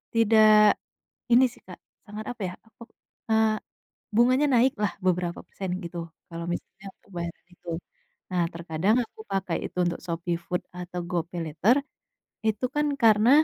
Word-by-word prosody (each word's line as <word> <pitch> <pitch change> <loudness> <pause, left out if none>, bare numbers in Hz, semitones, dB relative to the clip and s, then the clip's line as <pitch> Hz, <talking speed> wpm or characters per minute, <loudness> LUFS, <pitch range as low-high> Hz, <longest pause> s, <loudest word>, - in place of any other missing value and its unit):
tidak, 215 -1 +6 0.5
ini 245 +2 +7
sih - - -17
Kak - - -10 0.3
sangat 215 +1 -7
apa 230 - -10
ya, - - -8 0.8
eee, 220 0 +4 0.6
bunganya 255 +5 +5
naiklah 235 -4 +3 0.2
beberapa 180 -1 +1
persen 190 -2 -5
gitu 170 0 -6 0.3
kalo 170 0 -6
misalnya 195 +3 -6 0.2
pembayaran 170 -3 -6
itu, 175 - -18 0.6
nah 180 -2 +1
terkadang 170 +5 +1
aku 220 - -17
pakai 190 -3 0
itu - - -8
untuk 170 0 -1
Shopee 170 0 -2
Food 180 -1 -1
atau 180 0 -6
GoPaylater, 170 +4 +1 0.7
itu 220 +2 0
kan 295 0 +2 0.2
karena, 220 +1 +6
195 Hz, 135 wpm, -26 LUFS, 175-220 Hz, 0.8 s, ini